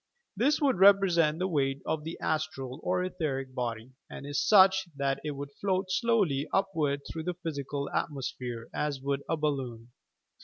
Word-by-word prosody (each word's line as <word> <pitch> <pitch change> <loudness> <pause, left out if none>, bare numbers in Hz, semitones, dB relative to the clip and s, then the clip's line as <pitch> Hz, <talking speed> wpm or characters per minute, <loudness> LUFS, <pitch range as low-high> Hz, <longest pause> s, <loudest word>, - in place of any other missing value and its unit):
This 270 +9 +2
would 275 - +2
repre 195 0 +6
sent 160 -2 +3
the 185 +2 0
weight 140 -5 0
of 160 -1 -2
the 160 +2 -6
"astral" 150 -4 -2
or 180 0 0
etherie 150 -7 -2
body, 120 -1 -4 0.2
and - - -8
is 145 0 -1
such 190 -2 +6
that 140 -1 -1
it 155 - -3
would 140 0 -6
float 190 -1 0
slowly 190 - +1
upward 160 -8 0
through 160 -1 -6
the 180 -1 -2
physical 145 -4 -4
atmosphere, 125 -4 -3
as 150 -2 -2
would 140 +1 -2
a 165 - +1
balloon. 130 -6 -3
150 Hz, 165 wpm, -29 LUFS, 135-185 Hz, 0.2 s, repre